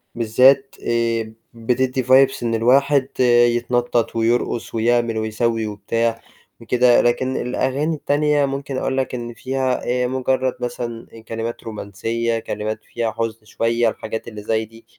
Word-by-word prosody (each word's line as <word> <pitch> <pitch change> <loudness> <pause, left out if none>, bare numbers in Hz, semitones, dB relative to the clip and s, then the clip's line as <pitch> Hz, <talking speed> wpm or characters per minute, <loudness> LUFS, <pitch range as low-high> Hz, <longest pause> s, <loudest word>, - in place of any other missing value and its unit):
بالذات 130 +4 +4
آآ 115 -1 0 0.2
بتدِّي 125 +3 0
vibes 130 +1 +4
إن 115 -1 0
الواحد 135 +4 +3 0.5
يتنطَّط 120 -1 0
ويرقُص 115 0 0
ويعمل 115 0 +1
ويسوِّي 110 +1 -1
وبتاع 115 +2 -1 0.4
وكده، 120 +1 +4
لكن 130 +2 0
الأغاني 140 +6 -1
التانية 145 0 +1
ممكن 135 -1 -4
أقول 130 - -1
لك 130 -1 -1
إن 120 -1 -6
فيها 130 +1 -1 0.2
آآ - - +1
مُجرّد 130 0 0
مثلًا 120 -1 -5 0.2
كلمات 115 +1 -4
رومانسية، 115 +2 -3
كلمات 110 -1 -4
فيها 115 -2 -3
حُزن 115 -1 -4
شوية 115 +1 +1
الحاجات 110 +1 -6
اللي 105 -2 -8
زي 110 0 0
دي، 115 +1 -18
120 Hz, 130 wpm, -20 LUFS, 115-130 Hz, 0.5 s, بالذات